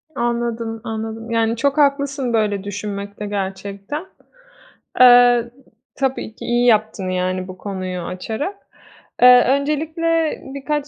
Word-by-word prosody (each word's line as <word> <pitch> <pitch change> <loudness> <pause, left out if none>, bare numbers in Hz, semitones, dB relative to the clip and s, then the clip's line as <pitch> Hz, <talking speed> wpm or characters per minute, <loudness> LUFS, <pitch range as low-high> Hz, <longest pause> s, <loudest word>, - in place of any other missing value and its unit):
Anladım, 235 -2 -2
anladım, 225 +1 -5
yani, 230 0 +1
çok 280 +4 0
haklısın 280 -3 +1
böyle 205 -3 0
düşünmekte 205 0 -6
gerçekten. 200 - -5 0.9
Eee, 245 -1 +6 0.4
tabii 265 -4 -2
ki - - -9
iyi 240 +1 +1
yaptın. 215 -4 +2
Yani, 185 0 -2
bu 185 0 -9
konuyu 185 -3 -5
açarak. 220 - -4 0.7
Eee, 250 0 +8
öncelikle 315 +3 0
birkaç 290 +1 -2
230 Hz, 110 wpm, -20 LUFS, 200-275 Hz, 0.9 s, Eee